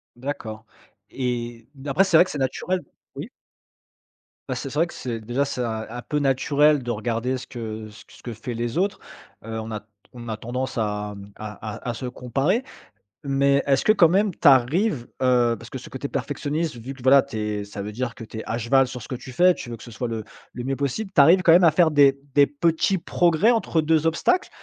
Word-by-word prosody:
D'accord 115 -4 -6 0.4
et 120 -3 -4
d 140 +1 -10
après 165 +8 +4
c'est 185 -4 +4
vrai 175 - +7
que - - -7
c'est 150 - -4
naturel 180 +7 -1 0.3
oui? - - -6 1.2
Bah, - - -1
c'est 135 - -5
c'est 145 - -3
vrai 170 - +3
que, - - -12
c'est 120 -3 -5
déjà 120 +6 -1
c'est 135 -2 -3
un 110 -2 -3
un 120 +2 -6
peu 150 +4 -2
naturel 145 +1 +3
de 120 - -6
regarder 120 +3 -2
ce - - -9
que 110 -3 -7
ce 105 - -15
q - - -20
ce - - -20
que 120 - -5
fait 115 +3 -6
les 120 +5 -3
autres, 195 +2 0 0.4
heu, 110 0 -5
on 110 0 -6
a 105 - -4
t - - -34 0.3
on 120 -2 -9
a 110 - -3
tendance 125 +3 -4
à, 105 -1 -2
mmh, 100 0 -12
à 105 0 -7
à - - -6
à 120 - -1
se 125 - -6
comparer 135 - -1 0.7
mais, 140 0 +3
est-ce 135 -1 +2
que - - +5
quand 190 -6 +6
même 195 +4 +2
tu - - +2
arrives, 140 - +3
heu 125 -2 +3
parce 115 - -12
que 130 - -6
ce - - -11
côté 130 +2 -5
perfectionniste, 145 +2 -3
vu 130 +4 -7
que, 130 - -15
voilà, 135 +2 +6
tu 130 -5 -7
es 105 -1 -2
ça 100 0 -7
veut 105 - -5
dire 120 +2 -3
que 125 - -10
tu 110 0 -9
es - - -5
à 115 - -2
cheval 130 +3 +3
sur 125 0 -7
ce - - -10
que 130 - -3
tu 130 +1 -9
fais. 180 +7 +5
Tu - - -8
veux 120 - -5
que 115 - -13
ce 120 - -11
soit 120 +2 -4
le 115 -2 -4 0.3
le 125 - -6
mieux 135 +2 -1
possible. 140 - -3
Tu - - +2
arrives 170 +7 +7
quand 170 - +5
même 175 +2 +7
à 165 - +7
faire 165 +1 +4
des 140 -2 +5 0.2
des 145 -1 +7
petits 165 +6 +1
progrès 175 +6 +3
entre 220 -8 +1
2 155 0 +2
obstacles? 165 - +1
130 Hz, 245 wpm, -23 LUFS, 115-150 Hz, 1.2 s, vrai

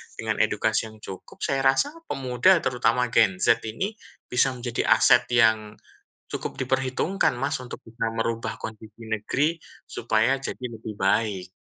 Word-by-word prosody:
dengan - - -3
edukasi 110 - +1
yang 110 - -15
cukup, 95 -1 -9
saya 135 -1 +1
rasa 135 - +3 0.2
pemuda, 130 +8 +3
terutama 125 -1 +1
Gen 100 -5 +4
Z 115 - +4
ini 195 - -3 0.4
bisa 125 +2 +5
menjadi 120 -1 -3
aset 125 0 +6
yang 110 -3 +2 0.5
cukup - - -5
diperhitungkan, 130 +9 0
Mas, - - -1
untuk 125 - -9
bisa 115 0 -4
merubah 115 0 -3
kondisi 110 0 -9
negeri 130 +9 -1 0.3
supaya 115 +4 +1
jadi 130 - -5
lebih 110 -1 -7
baik. 95 -2 0
115 Hz, 140 wpm, -25 LUFS, 110-130 Hz, 0.5 s, aset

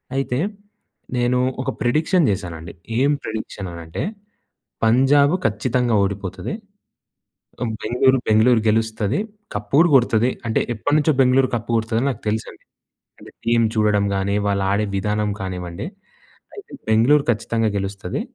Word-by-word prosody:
అయితే 135 -2 -1 0.8
నేను 125 +1 +2 0.2
ఒక - - -3
ప్రిడిక్షన్ 155 +7 +2
చేశానండి. 85 -4 -5 0.3
ఏం 140 +2 +3
ప్రిడిక్షన్ 110 -3 -5
అనంటే 85 -1 -6 0.8
పంజాబ్ 135 +6 +4
ఖచ్చితంగా 120 +3 0
ఓడిపోతది. 100 - -4 1.3
బెంగుళూరు 130 +3 +3
బెంగుళూరు 110 +2 +4
గెలుస్తది, 110 +2 0 0.4
కప్ - - -4
కూడా 165 +4 +6
కొడుతది. 120 -2 +4 0.2
అంటే 110 - +1
ఎప్పటినుంచో 150 +7 +2
బెంగుళూరు 130 0 +4
కప్ 115 -1 -3
కొడుతదని 115 +3 0
నాకు 120 - -6
తెలుసండి. 110 +1 -4 0.5
అంటే - - -13
టీమ్ 115 0 +3
చూడడం 105 -2 +2
కాని, 100 +1 0
వాళ్ళు 100 -1 +1
ఆడే 105 +2 +1
విధానం 105 +1 0
కానివ్వండి. 90 - -5 0.7
అయితే 410 - -11 0.2
బెంగుళూరు 125 +7 +4
ఖచ్చితంగా 115 0 -1
గెలుస్తది. 100 -2 -4
110 Hz, 120 wpm, -21 LUFS, 100-130 Hz, 1.3 s, కూడా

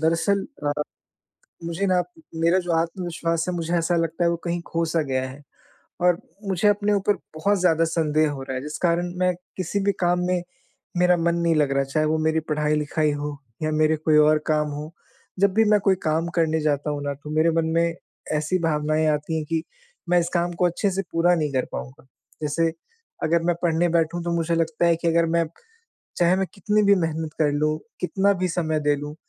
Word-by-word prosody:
दरअसल 165 +5 +1 0.2
अ, 145 - +2 0.9
मुझे 170 +4 -2
ना 185 -1 +3
म 175 -1 -9 0.2
मेरा 170 +3 +4
जो 175 -2 -2
आत्मविश्वास 165 -1 -1
है 180 - -1
मुझे 170 -1 -3
ऐसा 170 +1 +1
लगता 165 +1 0
है 170 - +3
वो 170 - 0
कहीं 170 0 -1
खो-सा 165 -1 0
गया 130 0 0
है। 135 +3 -11 0.6
और 180 -1 +4 0.3
मुझे 190 +2 +1
अपने 205 0 +2
ऊपर 205 +1 +2 0.2
बहुत 200 +6 +1
ज़्यादा 165 -2 +3
संदेह 155 -2 +1
हो 140 -2 -6
रहा 135 -1 -5
है, 130 - -3
जिस 150 +1 -6
कारण 175 0 +1
मैं 180 0 +3 0.2
किसी 190 +2 -1
भी 200 - +3
काम 175 0 +3
में 180 -1 +1 0.6
मेरा 180 0 +4
मन 170 0 +1
नहीं 170 -1 +2
लग 150 -2 +2
रहा। 140 - +3
चाहे 145 +3 0
वो 155 +1 +1
मेरी 160 0 +2
पढ़ाई-लिखाई 150 0 +1
हो 145 0 -4 0.3
या 155 - 0
मेरे 155 +1 +3
कोई 155 0 +2
और 150 0 +5
काम 150 -1 +2
हों, 150 +1 -6 0.5
जब 200 0 +3
भी 220 +2 +4
मैं 210 - +5
कोई 190 - +5
काम 160 +2 +1
करने 160 -2 +2
जाता 150 -1 0
हूँ 145 -1 -3
ना, 145 0 -2
तो 140 +2 -11
मेरे 160 +2 +4
मन 165 0 +1
में 170 0 +2 0.4
ऐसी 155 +5 0
भावनाएँ 155 -1 +1
आती 150 +2 -3
हैं 155 - -3
कि 165 -1 0 0.5
मैं 180 0 +5
इस 170 0 -1
काम 175 0 +1
को 180 - +4
अच्छे 180 +3 0
से 190 +1 -1
पूरा 175 +2 +3
नहीं 155 -3 -1
कर 130 -1 +1
पाऊँगा। 65 - -7 0.4
जैसे 160 +2 +1 0.5
अगर 170 +1 +2
मैं 175 0 +2
पढ़ने 170 0 +2
बैठूँ 170 +1 +1
तो 170 - -2
मुझे 170 0 0
लगता 165 0 0
है 170 -1 +4
कि 170 +1 -3
अगर 165 0 +3
मैं 165 - +2 0.7
चाहे 175 +1 +3
मैं 190 0 0
कितनी 210 +2 +1
भी 200 0 +6
मेहनत 160 -3 -2
कर 150 -2 +3
लूँ, 155 +1 0 0.2
कितना 195 +2 +2
भी 185 - +1
समय 160 -3 -1
दे 145 0 +2
लूँ 145 +1 -6
165 Hz, 210 wpm, -24 LUFS, 155-175 Hz, 0.9 s, भी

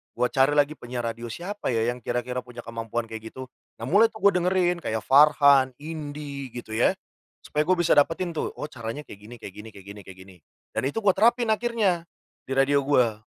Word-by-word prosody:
gue 125 +1 +1
cari 135 +2 +3
lagi 145 +1 +2
penyiar 120 0 -5
radio 115 +1 -7
siapa 180 - -6
ya 115 +1 +1
yang 125 - -7
kira-kira 120 +1 -3
punya 125 -1 -10
kemampuan 115 0 -4
kayak 110 0 -8
gitu? 130 0 -8 0.3
Nah, - - -5
mulai 210 +5 +6
tuh 215 - -12
gue - - 0
dengerin 180 0 +1
kaya 110 -8 -3
Farhan, 140 -2 +5
Indy 145 -3 -6
gitu 120 -2 -8
ya, 115 - +3 0.5
supaya 150 - -1
gue 185 - +4
bisa 170 - +3
dapetin 165 +5 +2
tuh, - - -2
"Oh 150 - -5
caranya 115 +3 -6
kayak 100 - -13
gini 120 +3 -10
kayak 95 - -9
gini 105 +2 -9
kayak 100 -1 -14
gini 100 0 -9
kayak 95 -1 -12
gini." 95 0 -15 0.4
Dan - - -1
itu 145 - -2
gua 195 -2 +5
terapin 235 +2 +3
akhirnya 215 -7 0 0.4
di 135 - -3
radio 140 +1 +3
gua. 120 -6 +2
135 Hz, 205 wpm, -25 LUFS, 115-165 Hz, 0.5 s, mulai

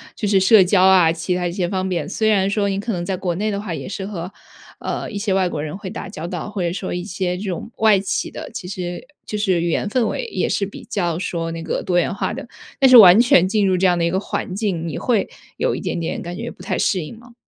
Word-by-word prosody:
就 210 - -2
是 200 -1 +4
社 195 +1 +6
交 185 +1 +3
啊， 185 -3 +6
其 170 +2 -2
它 180 0 -2
一 - - -3
些 180 -1 -1
方 185 +1 -2
面。 175 -5 -2
虽 220 -1 0
然 195 -2 +3
说 205 -1 0
你 195 0 -1
可 225 +3 -3
能 175 -2 -3
在 190 +1 -2
国 180 -2 -2
内 210 +4 -1
的 200 - -2
话 185 -5 -5
也 - - -6
是 190 -1 -5
和， 185 -3 -6 0.5
呃， - - -4
一 205 - -6
些 200 -1 -1
外 190 -1 +2
国 150 - -4
人 155 +4 -5
会 195 -2 -7
打 215 - -6
交 170 -4 -6
道， 175 +2 -5
或 205 -3 -4
者 170 - 0
说 190 - -4
一 175 0 -3
些 180 -1 -3
这 195 - -6
种 185 +6 -5
外 215 -3 +5
企 195 0 -2
的 - - -8
其 180 - -6
实 180 +4 -5 0.2
就 210 - -4
是 190 -5 +1
语 170 - 0
言 185 - 0
氛 240 +2 +1
围 - - -3
也 465 - -2
是 200 - 0
比 200 - -10
较 175 -7 -1
说 170 -2 -3
那 165 0 -6
个 - - -2
多 180 - 0
元 175 - +1
化 200 - -2
的， - - -6 0.3
但 270 - +5
是 255 - +10
完 190 -4 +10
全 185 -7 +5
进 210 +1 +1
入 185 -1 +2
这 185 +1 +3
样 175 - +2
的 170 - 0
一 170 - +1
个 190 - +1
环 190 - -4
境， 190 -5 -2
你 - - -4
会 230 -5 0 0.3
有 - - 0
一 - - -4
点 - - -3
点 165 -1 -3
感 175 0 -6
觉 - - -5
不 - - -15
太 190 - -2
适 185 - +1
应 220 - -10
吗？ 240 +1 -17
190 Hz, 310 characters per minute, -20 LUFS, 175-205 Hz, 0.5 s, 是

